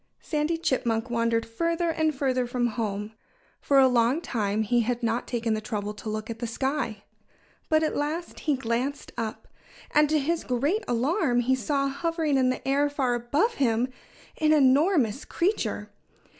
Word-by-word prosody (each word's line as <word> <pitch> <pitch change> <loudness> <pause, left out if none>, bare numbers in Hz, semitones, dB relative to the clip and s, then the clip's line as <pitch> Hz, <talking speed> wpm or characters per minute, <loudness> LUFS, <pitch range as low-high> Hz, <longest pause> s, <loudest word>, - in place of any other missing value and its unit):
Sandy 305 +2 -1
Chipmunk 250 -7 -1
wandered 230 -1 +1
further 335 +8 -1
and 315 -2 0
further 255 -2 0
from 245 0 0
home. 210 -2 -3 0.5
For 280 - +2
a 265 -1 +7
long 250 +3 +3
time 220 -8 -1
he 240 +3 +2
had 240 +1 -1
not 230 +1 0
taken 230 -2 -1
the 215 - -2
trouble 210 -2 -3
to 210 +1 -7
look 215 0 -4
at 230 -1 -6
the 235 - -3
sky. 235 -3 -2 0.7
But 315 0 +3
at 310 - 0
last 310 +4 -3
he 300 -3 +1
glanced 255 +3 -2
up. 225 -2 -5 0.4
And 300 0 +4
to 310 - +3
his 325 +3 0
great 285 - 0
alarm 250 - +1
he 255 +2 +2
saw, 275 +3 0
hovering 310 0 0
in 255 -1 +3
the 255 - -3
air 285 +2 +2
far 270 -4 0
above 285 - +1
him, 240 0 +2 0.5
an 310 0 +4
enormous 280 - +3
creature. 385 +5 -1
260 Hz, 170 wpm, -26 LUFS, 230-300 Hz, 0.7 s, a